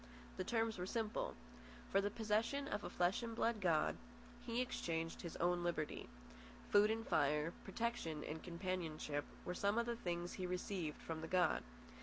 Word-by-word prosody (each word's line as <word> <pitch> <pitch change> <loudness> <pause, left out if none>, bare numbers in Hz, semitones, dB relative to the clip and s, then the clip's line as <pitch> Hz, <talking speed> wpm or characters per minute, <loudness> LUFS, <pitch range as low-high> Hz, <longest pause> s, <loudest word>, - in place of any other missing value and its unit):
The - - 0
terms 225 -3 +1
were 180 - -2
simple. 220 0 -1 0.6
For 195 - +5
the 205 - +1
possession 225 +6 +1
of 210 -4 -2
a - - -3
flesh 180 +5 +2
and 230 -1 -3
blood 230 -2 +1
god, 165 -4 +3 0.5
he 235 0 -1
exchanged 165 -9 -1
his 170 - -5
own 175 0 +2
liberty. 170 -3 -1 0.6
Food 205 +1 +7
and 225 +1 -1
fire, 150 +3 +3
protection 195 -8 -1
and 160 +1 -4
companionship, 170 -5 -2 0.2
were 180 - -1
some 200 +4 +2
of 235 - +3
the 235 0 -1
things 175 -5 -2
he 185 - -2
received 180 -3 -2
from 160 -1 -3
the 160 - -4
god. 180 +1 +3
185 Hz, 170 wpm, -41 LUFS, 165-225 Hz, 0.6 s, Food